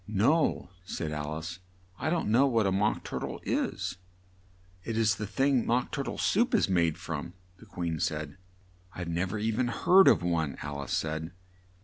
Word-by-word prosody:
"No," 110 - +2
said 80 -4 -4
Al 75 0 -3
ice, 85 +3 -6 0.4
"I 155 - -1
don't 165 -8 0
know 130 +5 +5
what 115 -5 +2
a 95 - +2
Mock 105 +3 +1
tur - - -4
tle - - -5
is." 90 - -2 0.9
"It 115 +1 -3
is 110 -1 +2
a 105 - -3
thing 135 +4 +2
Mock 120 +2 0
Tur 140 - -2
tle - - -4
Soup 235 +5 +2
is - - +3
made 85 -4 +2
from," 80 +2 -5 0.2
the 115 - -16
Queen 85 -4 -3
said. 75 -1 -3 0.6
"I've 90 -2 -5
nev 90 +4 -1
er - - -2
seen 115 +3 0
or - - -2
heard 190 +9 +6
of - - +5
one," 80 -5 0
Alice 70 -2 -4
said. 80 +2 -2
95 Hz, 190 wpm, -29 LUFS, 80-115 Hz, 0.9 s, heard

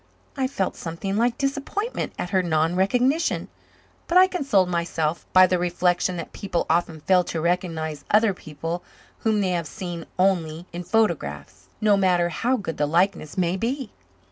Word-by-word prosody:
I 265 -2 0
felt 195 -9 -2
something 170 +4 -4
like 235 +2 +1
disappointment 280 - -2
at 180 - -4
her 190 -2 +3
non 165 -1 +1
recognition, 250 - +1 0.6
but 345 - +3
I 370 - +9
consoled 275 - +1
myself 170 -2 -2
by 185 0 +8
the 180 -1 +1
reflection 175 +1 +1
that 170 - -7
people 190 -4 -2
often 165 -2 0
fail 180 +2 +4
to 165 - -3
recognize 160 -3 -1
other 210 -1 +4
people 165 +1 -6 0.4
whom 220 -2 +1
they 190 -2 +1
have 170 -3 -1
seen 175 -2 -6
only 175 -3 +1
in 175 - -4
photographs, 220 +4 -1
no 210 -2 +4
matter 180 -3 +2
how 245 +10 0
good 180 -7 -5
the 150 - +1
likeness 170 -1 +1
may 175 -1 +1
be. 240 +4 -3
185 Hz, 165 wpm, -24 LUFS, 170-220 Hz, 0.6 s, I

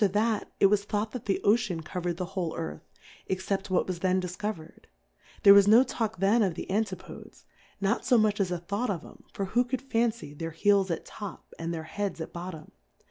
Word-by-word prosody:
iat, 210 +2 +1
it - - +6
was 200 0 +4
thought 210 +1 -2
that 250 - -6
the 195 - +1
Oceaa 205 -6 +2
coverMthe 175 +1 -3
whole 180 -4 -3
Earth, 75 -1 -5 0.5
except 195 +1 -2
what 185 - +2
was 180 -2 -4
then 185 +1 +2
difcoverM: 180 -2 -5 0.6
There 200 -2 +10
was 200 0 +7
no 225 +4 +8
talk 220 -5 -3
then 200 +5 +3
of 190 -6 +1
the - - -5
Antifodes^ 195 -3 -4 0.4
not 200 +4 0
fo 245 - +4
mucli 215 -1 +2
as 195 -3 +1
a 180 - -1
thought 200 +8 -2
of 180 -5 -3
'em, - - -15
for 195 - -3
who 245 +2 +4
could 255 +1 -3
fancy 230 - -1
their 165 +2 -5
Heels 200 -2 +4
at 165 - -3
top, 205 -4 -9
and 165 +1 -3
their 165 -2 -4
Heads 200 +2 -4
at 160 - -6
bottom 170 -3 -7
195 Hz, 200 wpm, -28 LUFS, 175-215 Hz, 0.6 s, There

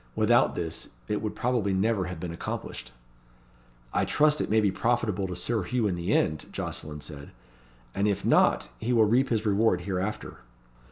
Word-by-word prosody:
Without - - +3
this, 80 -2 -4 0.2
it 105 - -1
would 105 -1 -3
probably 115 -5 0
never 100 0 +1
have 90 -2 -6
been 85 0 -5
accomplished." 65 -6 -6 1.0
"I - - +2
trust 150 0 +3
it - - -2
may 110 - +4
be 105 -3 +2
profitable 105 -4 0
to 90 - -5
Sir 110 +5 0
Hugh 120 +5 -1
in 100 - +1
the 85 +3 -2
end," 75 -7 +1
Jocelyn 75 -1 -5
said; 70 -1 -9 0.6
"and 100 +1 +1
if 100 -3 -1
not, - - +4
he 125 - -1
will 115 -2 +5
reap 125 +6 +3
his 110 -2 0
reward 100 -3 +2
hereafter." 95 +3 -3
100 Hz, 175 wpm, -27 LUFS, 90-115 Hz, 1.0 s, will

